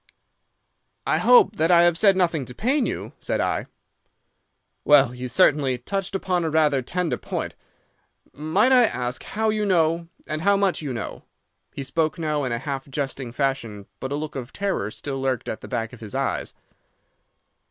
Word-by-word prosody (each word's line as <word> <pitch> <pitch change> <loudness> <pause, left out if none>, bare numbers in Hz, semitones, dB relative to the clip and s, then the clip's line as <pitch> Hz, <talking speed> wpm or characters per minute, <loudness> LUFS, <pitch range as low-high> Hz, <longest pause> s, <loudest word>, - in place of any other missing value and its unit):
"'I - - +2
hope 465 - +6
that 160 0 +2
I 170 -1 +6
have 175 -1 +4
said 195 +2 +5
nothing 170 -5 +1
to 125 - -11
pain 260 - +1
you?' - - -5
said - - -2
I. - - -1 1.2
"'Well, 140 -4 +5
you 125 0 -5
certainly 130 +1 +3
touched 195 +9 -3
upon 180 -2 0
rather 150 -3 +3
a - - -3
tender 175 +6 -2
point. - - -4 0.8
Might 175 - +2
I 250 -2 +7
ask 125 - -3
how 220 +1 -1
you 215 0 -1
know, 170 -3 +2 0.2
and 155 0 -4
how 200 +3 +3
much 195 -4 +1
you 145 -3 -4
know?' 115 -4 -5 0.5
He 140 - -4
spoke 155 +3 -1
now 150 -3 -1
in 125 - -2
a 120 - 0
half 135 +1 -5
jesting 135 -3 -3
fashion, 120 -7 -2
but 130 +1 -5
a - - 0
look 150 +1 -5
of 125 -2 -6
terror 195 - -2
still 135 +4 -5
lurked 130 -3 -1
at - - -4
the - - -9
back 115 -2 -3
of 125 - -11
his 110 -3 -8
eyes. - - -2
150 Hz, 180 wpm, -24 LUFS, 130-180 Hz, 1.2 s, I